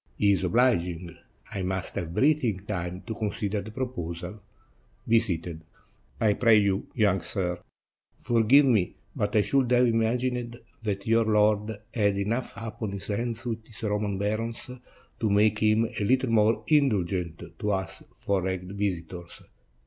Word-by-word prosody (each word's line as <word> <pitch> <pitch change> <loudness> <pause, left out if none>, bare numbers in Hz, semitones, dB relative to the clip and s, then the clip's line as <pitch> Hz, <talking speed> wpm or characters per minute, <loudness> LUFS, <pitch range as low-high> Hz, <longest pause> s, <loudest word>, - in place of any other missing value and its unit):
He 100 -1 +4
is 95 - +1
obliging; 90 -6 +1 0.4
I 100 - -2
must 95 0 -3
have 85 0 -4
breathing 130 -9 +2
time 90 -3 -4
to 115 - -4
consider 105 -1 -2
the 105 - -9
proposal. 105 -6 -5 0.7
Be 115 0 +5
seated, 85 -6 -4 0.6
I 105 -2 +3
pray 115 0 +5
you, 100 -1 +1
young 100 -5 +2
sir. 90 0 -2 0.6
Forgive 120 +5 +4
me, 110 -9 +2 0.2
but 105 +1 -1
I 105 - +5
should 135 0 +1
have 125 0 +5
imagined 120 +1 0 0.2
that 100 -3 -3
your 115 0 +3
lord 105 0 +2 0.2
had 100 -3 +2
enough 115 +6 -1
upon 110 -2 -5
his 100 -2 -6
hands 115 +3 -3
with 115 -2 -3
his 110 0 -14
Roman 105 -2 -1
barons, 110 +3 -2 0.5
to 110 - +1
make 105 +1 +3
him 110 +1 +3
a 105 - -4
little 130 +2 +2
more 110 0 +3
indulgent 95 - +1 0.2
to 105 - -1
us 95 -1 -3
foreign 95 -1 -2
visitors. 90 -3 -4
105 Hz, 150 wpm, -27 LUFS, 95-115 Hz, 0.7 s, Be